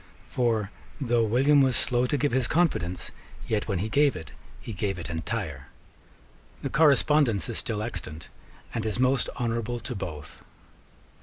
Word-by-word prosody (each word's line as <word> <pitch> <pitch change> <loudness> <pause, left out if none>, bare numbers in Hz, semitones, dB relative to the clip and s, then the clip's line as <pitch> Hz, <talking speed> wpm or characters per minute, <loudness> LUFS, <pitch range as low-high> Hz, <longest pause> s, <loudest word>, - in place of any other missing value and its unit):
For 115 -4 0 0.3
though 120 -4 +2
William 135 +6 +4
was 130 -2 +3
slow 125 0 +2
to 145 - 0
give 145 +1 +1
his 125 -1 +1
confidence, 120 - 0 0.4
yet, 110 -2 -1
when 100 -4 -1
he 100 +5 -1
gave 140 +3 +3
it, 80 -3 -8 0.3
he 115 - -7
gave 95 -1 -2
it 85 0 -6
entire. 80 -5 -4 1.0
The - - -2
correspondence 145 - +4
is - - -2
still 105 -2 -1
extant, 80 -8 -6 0.5
and 115 - -2
is 110 0 -1
most 130 0 +2
honourable 115 0 -1
to 120 - -5
both. 85 -8 -7
115 Hz, 155 wpm, -27 LUFS, 95-130 Hz, 1.0 s, William